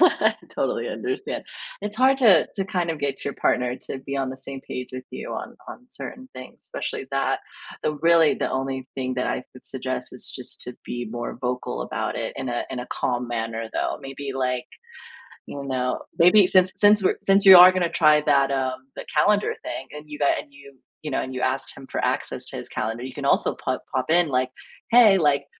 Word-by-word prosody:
I 360 - +4
totally - - -2
understand. - - -4 0.4
It's 210 +1 -4
hard 265 +2 +4
to 205 - +5
to 195 - -2
kind 180 -4 -1
of 160 - -4
get 140 -2 -3
your 140 - -3
partner 125 0 0
to 135 - -7
be 135 +1 -5
on 135 -1 -1
the 130 - -7
same 135 0 -6
page 125 0 -5
with 130 0 -6
you - - -7
on - - -6
on 250 - -10
certain 260 +2 -8
things, 130 0 -11
especially - - -5
that. - - 0 0.4
The, 155 - 0
really, 165 0 +4
the - - -2
only 130 0 -3
thing 130 -1 -3
that 125 - -1
I 125 - -2
would 130 - -14
suggest 130 -1 -3
is 125 - 0
just 125 -2 -3
to 125 - -7
be 120 -1 -5
more 120 0 -5
vocal 125 - -3
about - - -3
it - - -3
in 130 - -4
a 120 0 -2
in 130 - -4
a 125 - -7
calm 125 -1 -2
manner, 115 -1 -3
though. - - -2
Maybe, 135 0 -6
like, 125 -1 -1 0.8
you 140 - -7
know, 125 -1 -1 0.2
maybe 180 +3 +6
since 185 0 +4
since 205 -1 +5
we're - - +2
since 195 +1 +3
you 190 -1 +11
are 180 +1 +10
gonna 185 -2 0
try 155 -3 +4
that, 140 -2 +3
uh, 130 -2 0 0.2
the - - -7
calendar 205 +7 +3
thing - - -5
and 150 0 -9
you 150 - -7
got 145 - +2
and - - -10
you, 140 0 -15 0.3
you 150 - -4
know, - - 0
and 130 - -6
you 130 - -3
asked 130 +1 -1
him 135 - -10
for - - -3
access - - -1
to - - -6
his - - -7
calendar, 115 +2 -3
can 140 - -6
also - - +2
pop 130 -1 -2
pop 130 +1 -1
in 170 0 +4
like, 130 -1 +1 0.4
"Hey," 225 -5 +7
like, 140 -3 +2
140 Hz, 215 wpm, -24 LUFS, 130-170 Hz, 0.8 s, you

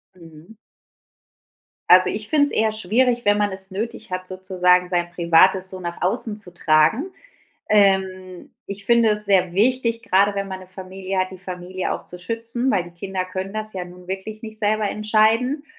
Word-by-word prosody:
Mhm. 165 +3 -15 1.3
Also, - - +7
ich - - -4
finde 300 -3 +4
es 285 - -1
eher 220 0 +1
schwierig, 235 +4 0
wenn 205 0 +4
man 205 -1 0
es 190 0 -10
nötig 220 +3 -5
hat, 185 0 -4
sozusagen 180 -1 +1
sein 175 -1 -1
Privates 180 +2 +3
so 185 - -7
nach 170 -1 -6
außen 210 +3 -1
zu 185 -4 -8
tragen. 165 - +2 0.6
Ähm, 190 -3 +1 0.2
ich 200 0 0
finde 235 +1 +4
es 210 0 -1
sehr 185 -3 +2
wichtig, 230 +2 +1
grade 200 +2 +2
wenn 200 0 -3
man 190 -1 -6
'ne 185 - -13
Familie 190 +1 -6
hat, 185 0 0
die 190 - -10
Familie 180 0 -5
auch - - -6
zu 180 - -5
schützen, 230 +6 -2
weil 185 -7 +1
die 175 - -12
Kinder 185 +2 -4
können 185 +1 -6
das 215 0 -2
ja 185 -2 -5
nun 180 0 -14
wirklich 195 +3 -6
nicht 220 -1 -7
selber 215 -1 0
entscheiden. 225 +7 +1
190 Hz, 180 wpm, -21 LUFS, 185-215 Hz, 1.3 s, Also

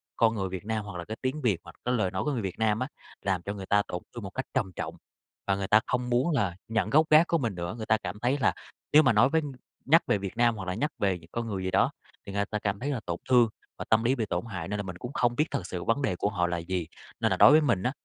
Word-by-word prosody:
con 115 -1 +3
người 95 -2 -2
Việt 95 +1 -6
Nam, 110 -1 -2
hoặc 100 -3 -7
là 85 - -6
cái 110 +1 -6
tiếng 135 +4 -2
Việt, 105 -8 +2
hoặc - - -13
cái 125 - +1
lời 95 -5 0
nói 95 - -2
của 150 - 0
người 120 -5 -1
Việt 95 +2 -5
Nam 110 0 +2
á 130 - -1 0.3
làm 95 -3 0
cho 100 +3 -4
người 95 -2 -7
ta 105 +1 +3
tổn 90 - -4
thương 120 - -6
một 95 - -5
cách 130 +6 -4
trầm 105 -9 0
trọng, - - -4 0.5
và 100 - +3
người 95 -1 -3
ta 105 - +6
không 125 0 -1
muốn 125 +7 +2
là 95 - 0
nhận 110 -3 0
gốc 155 +6 +5
gác 155 +3 +7
của 170 - +2
mình 115 - -2
nữa. 85 +2 -4
Người 110 - -5
ta 110 - +3
cảm 100 -1 -6
thấy 125 +5 +1
là 130 - +3 0.4
nếu 155 +1 +8
mà 130 - +4
nói 120 +6 +5
với 160 +1 +2 0.4
nhắc 165 +4 +6
về - - +3
Việt 100 +3 -6
Nam 120 -1 +3
hoặc 95 -3 -6
là 90 - -1
nhắc 145 +9 -1
về 95 -3 +1
những 80 +1 -18
con 120 -1 -3
người 95 -4 -3
gì 95 - -2
đó, - - +3 0.3
thì 100 - -7
người 100 0 0
ta 105 +1 -3
cảm 100 -1 -2
thấy 140 - -3
là 135 -5 -1
tổn 85 0 -2
thương 120 -3 +6 0.3
và - - -5
tâm 110 0 +4
lý 125 +3 +2
bị 115 - -1
tổn 90 +1 -2
hại 90 -6 -5
nên 105 - -2
là - - -2
mình 90 -2 -6
cũng 125 +8 -7
không 120 -3 +1
biết 150 - +2
thực 90 - -2
sự 90 -2 -5
vấn 120 +5 +1
đề 95 -10 0
của 100 - 0
họ 90 -4 0
là 85 0 -1
gì. 85 0 -3 0.3
Nên - - +1
là - - +1
đối - - +8
với 155 - +7
mình 120 -11 +1
á, 125 - +1
110 Hz, 320 wpm, -28 LUFS, 95-125 Hz, 0.5 s, nếu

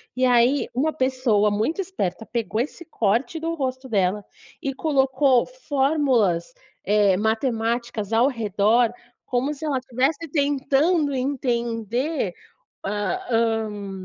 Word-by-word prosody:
e 255 0 +2
aí 250 +3 +3
uma 290 +6 +1
pessoa 255 -7 +1
muito 220 - -1
esperta 225 - -3
pegou 225 -2 -2
esse 305 +7 -4
corte 245 - 0
do 330 +1 -2
rosto 260 -3 -3
dela 200 -2 0 0.4
e 275 - -2
colocou 270 -3 +2
fórmulas, 270 - +1 0.3
eh, 205 -2 +3
matemáticas 225 0 -1
ao 235 +4 +4
redor, 225 -1 +2 0.3
como 260 +4 -1
se 300 +2 -7
ela 285 -4 0
estivesse 265 +6 -1
tentando 285 +2 +2
entender, 245 - -1 0.5
a 210 - -2
hã, 220 -3 0
250 Hz, 115 wpm, -23 LUFS, 220-280 Hz, 0.5 s, ao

